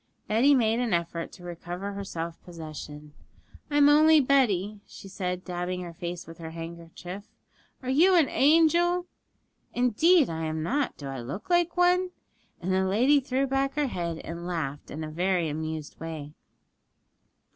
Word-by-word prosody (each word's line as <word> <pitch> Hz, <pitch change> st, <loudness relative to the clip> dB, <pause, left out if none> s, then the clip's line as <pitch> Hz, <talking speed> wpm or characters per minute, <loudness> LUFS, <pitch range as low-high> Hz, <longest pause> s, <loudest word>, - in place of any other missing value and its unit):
Betty 255 Hz, +7 st, +4 dB
made 230 Hz, -2 st, +2 dB
an 235 Hz, -7 st, +1 dB
effort 170 Hz, 0 st, -3 dB
to 180 Hz, -, -13 dB
recover 175 Hz, +3 st, -6 dB
her 200 Hz, 0 st, -5 dB
self 170 Hz, -3 st, -6 dB
possession. 155 Hz, -3 st, -9 dB, 0.6 s
'I'm 290 Hz, -1 st, +5 dB
only 310 Hz, +2 st, +6 dB
Betty,' 215 Hz, -8 st, +2 dB
she -, -, -12 dB
said, 185 Hz, -1 st, -4 dB
dabbing 180 Hz, 0 st, -3 dB
her 175 Hz, -1 st, -7 dB
face 175 Hz, +1 st, -6 dB
with 165 Hz, 0 st, -12 dB
her 160 Hz, -1 st, -6 dB
handkerchief; 170 Hz, +3 st, -8 dB, 0.6 s
'are 255 Hz, -, -4 dB
you 350 Hz, +7 st, +5 dB
an 325 Hz, -5 st, +5 dB
angel?' 340 Hz, +5 st, +3 dB, 0.7 s
'Indeed 280 Hz, -, +4 dB
I 160 Hz, 0 st, -3 dB
am 155 Hz, 0 st, -2 dB
not; 275 Hz, -, -1 dB
do 145 Hz, -, -9 dB
I 135 Hz, -1 st, -5 dB
look 165 Hz, -, -7 dB
like 345 Hz, 0 st, +2 dB
one?' 360 Hz, +1 st, +3 dB, 0.5 s
And 185 Hz, +2 st, -2 dB
the 190 Hz, 0 st, +2 dB
lady 250 Hz, +9 st, +4 dB
threw 265 Hz, 0 st, 0 dB
back 270 Hz, +1 st, 0 dB
her 295 Hz, -1 st, +1 dB
head 170 Hz, -9 st, -3 dB
and 170 Hz, +1 st, -6 dB
laughed 150 Hz, -5 st, -4 dB
in 155 Hz, +2 st, -6 dB
a 155 Hz, -, -6 dB
very 175 Hz, +1 st, +1 dB
amused 155 Hz, 0 st, -5 dB
way. 155 Hz, -2 st, -6 dB
185 Hz, 160 wpm, -27 LUFS, 165-275 Hz, 0.7 s, only